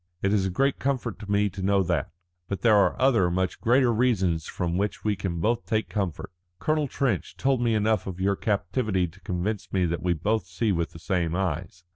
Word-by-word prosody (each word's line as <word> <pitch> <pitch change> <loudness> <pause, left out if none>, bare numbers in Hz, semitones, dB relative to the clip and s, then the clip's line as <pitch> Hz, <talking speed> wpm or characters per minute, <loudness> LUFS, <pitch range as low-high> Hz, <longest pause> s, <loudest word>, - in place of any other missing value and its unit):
It 100 +1 +2
is 95 -2 +2
a - - -1
great 135 +9 +1
comfort 130 -5 -2
to 105 - -9
me 105 0 +3
to 95 +1 -7
know 100 0 +3
that. 85 -5 -1 0.4
But 95 -1 -4
there 110 -1 +5
are 100 - +3
other, 120 -9 +4
much 95 +1 -1
greater 120 +1 +4
reasons 95 -9 +1
from 85 -1 -2
which 100 +2 -2
we 105 -1 +1
can 95 -3 -3
both 115 +7 0
take 110 0 0
comfort. 95 -6 -3 0.3
Colonel 155 - 0
Trench 135 -1 -1
told 135 -2 +1
me 115 -2 +2
enough 105 -2 +1
of 95 -1 -5
your 100 +1 +2
captivity 100 -1 0
to 95 +4 -17
convince 95 +4 -3
me 95 -2 +2
that 85 0 -2
we 90 -1 +1
both 105 +6 -1
see 90 +5 0
with 85 -3 0
the - - -9
same 85 -1 -1
eyes. 90 -1 -3
100 Hz, 215 wpm, -26 LUFS, 90-110 Hz, 0.4 s, there